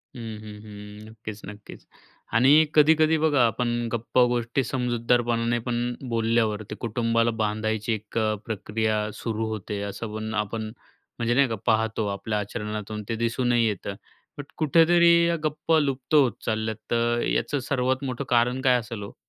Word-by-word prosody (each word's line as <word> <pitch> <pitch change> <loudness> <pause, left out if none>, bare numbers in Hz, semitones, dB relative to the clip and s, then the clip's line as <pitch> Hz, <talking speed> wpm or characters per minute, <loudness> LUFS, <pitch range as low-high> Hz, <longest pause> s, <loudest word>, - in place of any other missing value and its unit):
हं, 115 -3 -6
हं, 105 -1 -10
हं. 105 0 -11
नक्कीच, 110 -1 -9
नक्कीच. 105 +1 -11 0.5
आणि 135 +7 +6
कधी-कधी 155 +1 +5
बघा, 150 -5 +3
आपण 120 0 -1
गप्पा 120 +2 +2
गोष्टी 120 +2 0
समजूतदारपणाने 120 -1 0
पण 120 0 -1 0.2
बोलल्यावरती 115 -2 0
कुटुंबाला 115 0 +1
बांधायची 110 +1 -1
1 110 +1 -6
अ, 110 -1 +1
प्रक्रिया 110 0 -1 0.2
सुरू 110 -1 -3
होते, 105 -1 -4
असं 105 +2 -6
पण 110 0 -4
आपण, 110 +1 -5 0.5
म्हणजे 120 0 +1
नाही 140 +2 +4
का 115 - -1
पाहतो 110 0 +1
आपल्या 105 +2 -3
आचरणातून 105 0 -5
ते 115 - -1
दिसूनही 120 +1 +1
येतं, 100 -2 -3 0.4
बट 145 - -6
कुठेतरी 170 +2 +5 0.2
या 170 - +1
गप्प 155 +1 -2
लुप्त 135 0 -1
होत 135 -5 +5
चालल्यात 110 0 -1
तर 120 0 +1
याचं 145 - 0
सर्वात 130 0 0
मोठं 130 0 -3
कारण 125 +2 +2
काय 130 -2 +4
असेल 115 -3 -7
हो? 100 - -9
115 Hz, 150 wpm, -25 LUFS, 110-125 Hz, 0.5 s, आणि